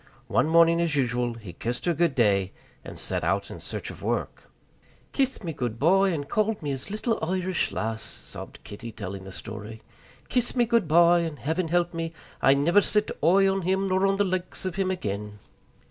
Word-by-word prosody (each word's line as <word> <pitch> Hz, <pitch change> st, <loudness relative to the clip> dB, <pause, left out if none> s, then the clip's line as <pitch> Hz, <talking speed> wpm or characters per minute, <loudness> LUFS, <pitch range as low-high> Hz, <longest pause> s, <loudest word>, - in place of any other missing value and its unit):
One -, -, +3 dB
morning 170 Hz, +1 st, +5 dB
as 165 Hz, -3 st, +1 dB
usual 125 Hz, -3 st, 0 dB
he 105 Hz, -6 st, -10 dB
kissed 120 Hz, +7 st, -4 dB
her 175 Hz, -, +2 dB
good 165 Hz, -3 st, +1 dB
day, 100 Hz, -5 st, +2 dB, 0.3 s
and -, -, -9 dB
set -, -, -2 dB
out -, -, 0 dB
in -, -, -8 dB
search -, -, -5 dB
of -, -, -12 dB
work. -, -, -3 dB, 0.6 s
"Kissed 265 Hz, -4 st, 0 dB
me 165 Hz, -3 st, -3 dB
goodby, 150 Hz, -, +2 dB
and 145 Hz, -4 st, -3 dB
called 215 Hz, 0 st, 0 dB
me 145 Hz, -, -1 dB
his 135 Hz, +4 st, -5 dB
little 215 Hz, +3 st, -1 dB
Irish 185 Hz, +1 st, 0 dB
lass," 110 Hz, 0 st, -2 dB
sobbed -, -, -7 dB
Kitty, 115 Hz, +3 st, -8 dB
telling 100 Hz, -2 st, -7 dB
the 95 Hz, -, -8 dB
story, 110 Hz, +3 st, -8 dB, 0.4 s
"kissed 245 Hz, 0 st, 0 dB
me 240 Hz, -1 st, +4 dB
goodby, 175 Hz, -7 st, +5 dB
and, 160 Hz, -3 st, -4 dB
Heaven 160 Hz, +5 st, -1 dB
help 175 Hz, +1 st, +1 dB
me, 165 Hz, 0 st, -3 dB, 0.3 s
I 135 Hz, -, +6 dB
niver 170 Hz, +8 st, +4 dB
set 210 Hz, +2 st, +1 dB
oi 195 Hz, +4 st, +5 dB
on 195 Hz, 0 st, +1 dB
him 190 Hz, +2 st, +1 dB
nor 190 Hz, +1 st, +3 dB
on 195 Hz, -, +2 dB
the 205 Hz, -, +2 dB
likes 185 Hz, -1 st, -3 dB
of 185 Hz, -, -2 dB
him 190 Hz, 0 st, 0 dB
again!" 105 Hz, -, -4 dB
165 Hz, 190 wpm, -26 LUFS, 120-190 Hz, 0.6 s, I